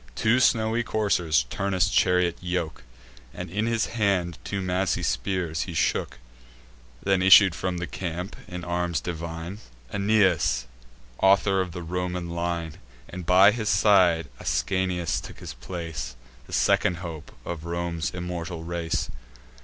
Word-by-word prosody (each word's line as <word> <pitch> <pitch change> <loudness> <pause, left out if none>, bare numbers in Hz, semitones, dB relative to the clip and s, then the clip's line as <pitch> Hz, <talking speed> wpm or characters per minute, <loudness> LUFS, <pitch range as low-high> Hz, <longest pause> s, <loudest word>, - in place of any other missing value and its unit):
Two 115 +3 +3
snowy 115 -2 +3
coursers 90 - +1
Turnus' 100 -4 +1
chariot 90 -1 +3
yoke, 90 -3 -3 0.5
And - - -6
in 105 +4 0
his 115 -1 +1
hand 95 -6 0
two 100 - -3
massy 90 0 0
spears 90 -5 -1
he - - -6
shook: - - 0 0.9
Then 95 -1 +2
issued 95 0 +8
from 90 0 -3
the 85 - -3
camp, 90 +2 -5
in 90 0 -6
arms 85 -3 -1
divine, 85 +4 -6 0.3
Aeneas, 100 - +2 0.5
author 95 0 +4
of 90 -2 -3
the 90 -1 -6
Roman 90 0 -3
line; 85 -2 -3 0.3
And 90 -1 -7
by 95 +3 +7
his 110 -1 -2
side 90 -5 +4
Ascanius 90 -3 -1
took - - -10
his - - -8
place, 80 -1 -6 0.3
The - - -11
second 90 - +3
hope 80 -3 -7
of 85 -2 -5
Rome's 85 -1 -2
immortal 90 -2 -5
race. 85 -1 -2
90 Hz, 135 wpm, -26 LUFS, 85-95 Hz, 0.9 s, issued